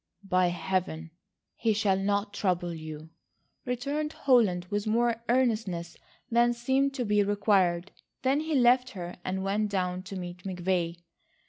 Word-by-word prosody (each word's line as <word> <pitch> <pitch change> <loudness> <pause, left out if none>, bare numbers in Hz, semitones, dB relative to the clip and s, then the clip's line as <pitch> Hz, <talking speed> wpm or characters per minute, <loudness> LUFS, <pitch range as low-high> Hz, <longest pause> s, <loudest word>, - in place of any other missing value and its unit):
"By 185 -2 +2
Heaven, 170 -2 -2 0.4
he 225 -2 +1
shall 205 -2 +2
not 200 +1 0
trouble 175 -4 0
you," 155 0 -8 0.5
returned 285 +5 -2
Holland 215 -10 +3
with 205 +1 -1
more 230 +1 +1
earnestness 215 -9 0 0.4
than 240 +1 +4
seemed 265 +3 +1
to 250 - -1
be 210 -1 +3
required. 195 -3 +2 0.3
Then 270 +2 +3
he 315 0 -1
left 250 0 +4
her 175 0 -6
and 190 +1 -2
went 205 +2 0
down 180 -2 -1
to 195 +1 -8
meet 180 -1 -6
McVay. 180 -2 -1
200 Hz, 140 wpm, -28 LUFS, 180-240 Hz, 0.5 s, than